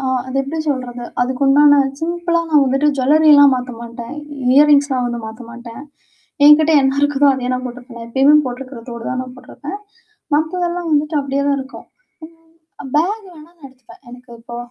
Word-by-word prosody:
அ. 270 - -5 0.2
அது 260 - -5
எப்பிடி 275 +4 -5
சொல்றது? 250 -3 -4 0.2
அதுக்குண்டான 275 +3 +3 0.2
சிம்பிளா 340 +1 -1
நான் 295 -2 +4
வந்துட்டு 270 +3 0
ஜுவெல்லரி 305 +5 +3
எல்லாம் 285 -1 +6
மாத்தமாட்டேன். 235 0 -8 0.4
இயர்ரிங்ஸ்லாம் 285 -3 +3
வந்து 240 -1 -4
மாத்தமாட்டேன். 235 +2 -11 0.6
என்கிட்ட 310 +2 +6
என்ன 270 +1 0
இருக்குதோ 290 0 +2
அதையே 255 -1 -3
நான் 255 - -5
போட்டுக்குவேன். 245 0 -11
நான் 230 - -10
எப்பவுமே 275 +4 +4
போட்டுக்கிற 255 0 -7
தோடு 235 -1 -8
தான் 255 0 -5
போட்டுருப்பேன். 300 +8 -9 0.6
மத்ததெல்லாம் 345 +2 -2
வந்துட்டு 300 +1 0
அப்பிடியேதான் 280 +1 -1
இருக்கும். 265 +1 -11 1.0
ம் 265 - -9
அ - - -3
பேக் 400 +8 0
வேணா 315 0 -15
நான் 335 -5 -17
எடுத்துப்பேன். 255 -3 -19
எனக்கு 245 0 -14
இப்போ, 235 +1 -10
270 Hz, 155 wpm, -17 LUFS, 250-300 Hz, 1.0 s, எல்லாம்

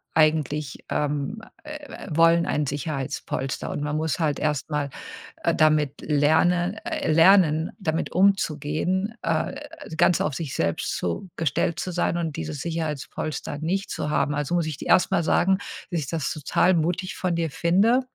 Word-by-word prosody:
eigentlich 155 -2 +1
ähm, 150 +9 -2 0.2
äh, 300 - -9
äh, 260 - -10
wollen 165 +2 +4
ein 150 -1 0
Sicherheitspolster 135 -2 -3
und - - -3
man 150 0 -2
muss 160 0 -1
halt 150 -3 0
erst 150 0 -1
mal, 145 -1 -1 0.5
äh, - - +2
damit 155 -2 +2
lerne 175 +6 +2
äh, - - -1
lernen, 165 -1 +5
damit 160 -3 -1
umzugehen, 185 +1 +1
äh, - - -1 0.4
ganz 175 - +4
auf 150 - 0
sich 150 -3 -4
selbst 85 - -1
zu 90 - -3
gestellt 165 +2 0
zu 185 - -3
sein 175 0 0
und 165 -3 -3
dieses 80 - -4
Sicherheitspolster 155 -3 -4
nicht 190 +5 -2
zu 150 - -3
haben. 150 -1 +1
Also, 145 +4 -1
muss 170 -2 +1
ich 155 -4 -4
dir - - -7
erst 180 - +4
mal 170 - +2
sagen, 190 +3 +3 0.3
dass 170 - 0
ich 140 - -4
das 160 -2 -2
total 165 +4 +2
mutig 175 +3 -1
von 180 -2 -1
dir 165 -3 -1
finde, 200 - +3
160 Hz, 165 wpm, -25 LUFS, 150-175 Hz, 0.5 s, lernen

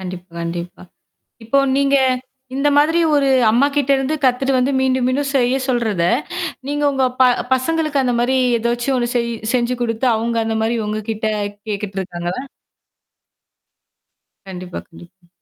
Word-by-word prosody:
கண்டிப்பா, 180 -1 -8
கண்டிப்பா. 170 +1 -5 0.6
இப்போ 230 +5 +2 0.2
நீங்க 280 0 +3 0.6
இந்த 280 +2 +2
மாதிரி 315 +3 +4 0.2
ஒரு 280 -1 +3 0.2
அம்மாகிட்ட 280 +3 +2
இருந்து 270 +3 -1
கத்துட்டு 260 +2 +2
வந்து 255 +2 +2
மீண்டும் 260 -1 +1
மீண்டும் 275 +2 0
செய்ய 250 -1 +3
சொல்றத, 230 -8 0 0.7
நீங்க 290 +1 -1
உங்க 265 -1 +1 0.2
ப - - +8 0.3
பசங்களுக்கு 305 +2 0
அந்த 250 -1 +1
மாரி 250 +2 +1 0.2
ஏதாச்சும் 240 +3 -1
ஒண்ணு 240 -1 -1
செய் 235 -1 0 0.2
செஞ்சு 250 0 +1
குடுத்து 230 +1 0
அங்க 230 +1 -1
அந்த 225 0 -1
மாரி 230 +2 0
உங்க 215 +1 -2
கிட்ட 220 0 -4 0.4
கேட்டுட்டு 200 -1 -3
இருக்காங்களா? 175 0 -4 2.1
கண்டிப்பா, 180 -1 -7
கண்டிப்பா. 175 +2 -17
240 Hz, 135 wpm, -19 LUFS, 210-270 Hz, 2.1 s, ப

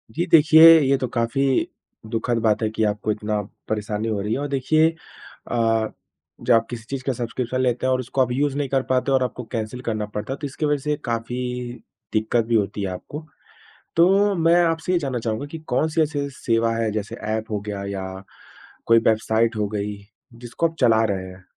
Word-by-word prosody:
जी, 170 - 0
देखिए, 160 +1 +8
ये 135 -1 +2
तो 130 - -2
काफ़ी 130 +3 +1 0.4
दुखद 115 +1 -1
बात 110 0 +2
है 110 - +1
कि 110 - +1
आपको 105 +1 -1
इतना 105 0 -2 0.3
परेशानी 105 +1 -2
हो 105 -2 -1
रही 105 +2 -2
है - - -1
और 145 - -2
देखिए 145 +4 +2 0.6
अ, 115 -2 +2 0.5
जब 125 - +3
आप 115 0 +4
किसी 120 -2 -6
चीज़ 135 -2 -4
का 135 - -1
सब्स्क्रिप्शन 125 +2 -3
लेते 125 0 0
हैं 130 - +2
और 130 - 0
उसको 130 +2 -1
आप 125 -1 +1
यूज़ 140 +2 0
नहीं 140 -3 -1
कर 135 -1 +2
पाते 130 +1 +1
और 130 -1 +3
आपको 125 0 -4
कैंसल 115 +2 -4
करना 110 -3 -2
पड़ता 105 +4 -5
है, - - -6
तो 145 - -4
इसके 145 +3 -4
वजह 145 0 +2
से 150 0 0
काफ़ी 115 +1 -3 0.8
दिक्कत 110 +1 +1
भी 115 0 0
होती 105 -1 0
है 100 - -1
आपको। 150 - -8 0.7
तो 195 +4 +4
मैं 165 0 +3
आपसे 165 +1 0
ये 175 - +3
जानना 135 -5 -2
चाहूँगा 110 +4 -3
कि 165 - -5 0.2
कौन-सी 160 +4 +1
ऐसी 145 -2 -1
सेवा 115 -1 +1
है, 115 -1 0
जैसे 105 -1 -4 0.2
एप 110 0 -7
हो 105 - -1
गया 100 -1 -4
या 100 -1 -4 0.8
कोई 115 0 +6
वेबसाइट 110 +1 +2
हो 105 -1 0
गई, 105 -1 -3 0.4
जिसको 120 +7 -2
आप 165 - -11
चला 115 -3 +4
रहे 95 -1 -5
हैं 95 0 -14
120 Hz, 205 wpm, -22 LUFS, 110-140 Hz, 0.8 s, देखिए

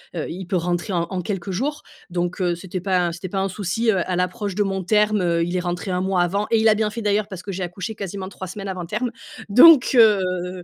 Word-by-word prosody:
heu, 160 - -2
il 185 +1 -7
peut 185 - -1
rentrer 175 +2 -1
en 170 -2 +1
en 185 -1 -2
quelques 195 0 -4
jours, 290 +10 -3 0.3
donc 175 +1 -2
heu, 175 -1 +1
c'était 185 +1 -6
pas 190 -1 +1
un 170 - -1
c'était 175 +2 -7
pas 195 0 -1
un 195 - 0
souci, 210 +4 -1
heu, 190 - +1
à 180 - 0
l'approche 195 +2 -2
de 210 - +2
mon 195 -1 -2
terme, 210 +1 +2
heu, 170 -1 +1
il 175 +1 -3
est - - +1
rentré 180 +2 -3
1 180 0 0
mois 185 -2 +1
avant 200 +4 -1
et 225 - +3
il 220 - +3
a 215 - +6
bien 215 0 0
fait 220 +1 -6
d'ailleurs 205 0 +1
parce 185 -2 -8
que 200 - -5
j'ai 190 +1 -5
accouché 185 +5 -4
quasiment 195 -1 -6
3 190 -1 -8
semaines 195 +2 -7
avant 180 -3 -5
terme. 235 +5 -2 0.4
Donc 270 +6 +8
heu, 185 -5 +3
190 Hz, 265 wpm, -22 LUFS, 180-210 Hz, 0.4 s, Donc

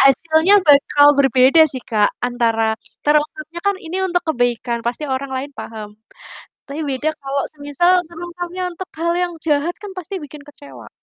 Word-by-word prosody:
hasilnya 315 +7 +4
bakal 290 0 +5
berbeda 270 +2 +5
sih, 260 -2 -6
Kak, 210 -2 +3 0.2
antara 235 -2 0 0.4
terungkapnya 305 +2 0
kan, 400 -1 +2
ini 330 +3 -5
untuk 355 -1 0
kebaikan, 245 -3 0
pasti 240 +6 -2
orang 275 +1 -4
lain 275 +2 -5
paham. 215 -2 -7 0.8
Tapi, 285 +2 -7
beda 275 +3 -1
kalau 275 0 -2
semisal 290 +4 0 0.2
terungkapnya 350 +2 -7
untuk 365 +2 -8
hal 340 +1 0
yang 350 -1 -3
jahat, 300 +3 0
kan 410 - -8
pasti 370 +2 -6
bikin 295 0 -11
kecewa. 290 -1 -13
290 Hz, 150 wpm, -19 LUFS, 260-340 Hz, 0.8 s, bakal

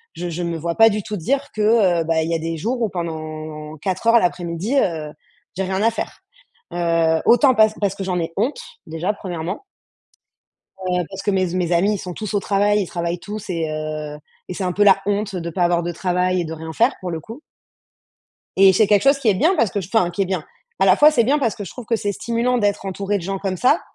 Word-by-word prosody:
je 175 0 -4
je 170 +1 -4
me 170 -1 -2
vois 170 +1 -3
pas 225 0 +7
du 210 -2 -2
tout 210 -1 -4
dire 275 - -1
que, 210 -5 +3
heu, 160 - -3
bah, 160 0 +1
il 160 - -3
y - - +1
a - - -1
des 165 +1 -3
jours 240 +9 -2
où 225 - +1
pendant 155 -3 -6
4 190 +7 -3
heures 230 0 +7
l'après-midi, 175 +5 -1
heu, 160 - -1 0.5
j'ai 190 - 0
rien 190 +1 -2
à 230 - +4
faire, - - -6 0.5
heu, 165 -2 +1
autant 255 +2 +5
parce 215 0 +5
parce 200 -1 +1
que 195 - -5
j'en 180 -2 -1
ai 165 0 -3
honte 255 - 0 0.3
déjà 170 +6 -2
1° 180 - -5 1.1
heu, 180 -2 -1
parce 195 0 -7
que 205 - 0
mes 190 -1 +1
z 170 - -5
mes 180 -2 0
amis, 190 +5 +3
ils - - -3
sont 180 -2 -7
tous 215 +1 -5
au 200 - +2
travail, 205 +2 +2
ils - - -4
travaillent 170 0 -3
tous 205 +1 -7
et 165 -3 -1
heu 155 -1 -4 0.3
et - - -3
c'est 190 - -3
un 180 - 0
peu 205 - +1
la 195 -1 +6
honte 205 -1 -1
de 170 -1 -4
pas 175 +2 0
avoir 175 0 +2
de 175 +1 -3
travail 180 +1 0
et - - -2
de 160 - -6
rien 160 0 -7
faire, 235 - +2
pour 180 - -3
le 165 -1 -4
coup. 225 - -10 1.2
Et 195 0 +7
c'est 210 +3 +4
quelque 205 0 +3
chose 275 +1 +4
qui 255 - 0
est 205 - +5
bien 320 - +3
parce 225 -8 +2
que 200 - -2
je 180 - -8
enfin, 220 -7 +3
qui 175 +3 -1
est - - -1
bien. 180 -4 -2 0.4
À 195 - +4
la 185 +1 +6
fois, 300 +1 +7
c'est 240 -7 +2
bien 285 +5 +2
parce 230 -7 0
que 205 - -6
je - - -9
trouve 250 -3 -10
que 230 - +1
c'est 205 -1 -2
stimulant 235 +3 0
d'être 205 -2 0
entourée 195 +2 -2
de - - -8
gens 195 +2 -3
comme 190 -1 -3
ça. 260 - +3
190 Hz, 260 wpm, -21 LUFS, 170-215 Hz, 1.2 s, pas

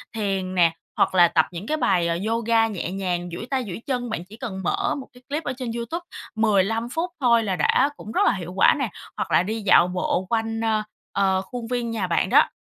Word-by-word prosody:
thiền 195 -3 -2
nè, 170 -2 +4 0.2
hoặc - - +2
là 175 -1 +7
tập 160 -2 +3
những 180 +4 -7
cái 310 - 0
bài, 180 - +2
ờ, 170 0 0
yoga 230 0 +2
nhẹ 190 -5 -4
nhàng, 180 -2 -2
duỗi 200 +7 -6
tay 265 -2 +1
duỗi 190 +3 -6
chân. 245 -3 -2
Bạn 175 -6 -4
chỉ 205 +4 -13
cần 195 -6 -5
mở - - 0
một 275 - -7
cái 250 0 -18
clip 300 +3 -2
ở 255 - -2
trên 250 -3 -4
YouTube 235 +9 -4 0.3
15 220 +1 +2
phút 330 +7 -2
thôi 235 -3 +4
là 195 -3 -1
đã 255 - +3
cũng 215 - -9
rất - - +1
là - - +4
hiệu 180 -2 -6
quả 195 - +6
nè. 265 -5 0 0.3
Hoặc - - -3
là - - +4
đi 220 +4 -3
dạo 185 -3 +5
bộ 180 0 -1
quanh, 225 -1 -1
ơ, 220 -1 +1 0.3
ờ, 190 -1 +2
khuôn 230 +4 -7
viên 240 -1 -2
nhà 215 -5 -1
bạn 170 - +1
đó, - - +5
220 Hz, 240 wpm, -24 LUFS, 185-235 Hz, 0.3 s, là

